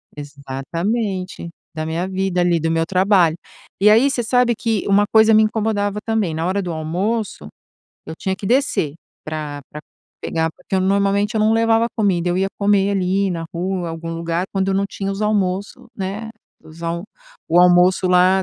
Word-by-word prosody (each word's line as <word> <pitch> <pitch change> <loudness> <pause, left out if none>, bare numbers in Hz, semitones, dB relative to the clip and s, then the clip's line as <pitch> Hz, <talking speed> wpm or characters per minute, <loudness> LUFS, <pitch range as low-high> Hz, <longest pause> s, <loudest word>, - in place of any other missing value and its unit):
Exatamente. 170 - -4 0.3
Da 155 0 -3
minha 165 +3 -2
vida 190 -1 -1
ali, 175 -1 +2
do 165 +1 -1
meu 165 0 +1
trabalho. 185 -2 +3 0.4
E 205 +2 +5
aí, 230 +6 +5
você 250 -3 -1
sabe 245 0 +2
que 225 -4 -1
uma 200 +1 +4
coisa 220 0 +6
me 215 0 +6
incomodava, 210 -2 -1
também: 220 -7 -1
na 160 +1 -2
hora 190 +3 0
do 180 -2 -4
almoço, 175 - -3 0.6
eu - - -6
tinha 190 0 -2
que 195 - -7
descer 245 - +1 0.3
pra 150 -2 -5
pra 150 - -8 0.4
pegar, 160 0 -1
porque, - - -6
eu 190 - +2
normalmente, 200 +3 +1
eu 220 - +1
não 215 +1 +3
levava 225 0 +3
comida, 185 -6 +1
eu 175 - 0
ia 195 +1 +1
comer 200 -1 +2
ali 195 0 0
na 165 -2 -3
rua, 180 0 -2
algum 165 0 -6
lugar, 170 +1 -2
quando 195 -1 0
eu 195 - +1
não 195 +1 +1
tinha 195 -1 -4
os 195 - -6
almoço, 200 -2 -1
né, 200 +3 -5 0.3
os 160 +2 -14
al 170 +1 -3 0.4
o 170 +2 +4
almoço 180 +1 +4
lá 185 +1 +4
190 Hz, 180 wpm, -20 LUFS, 170-210 Hz, 0.6 s, coisa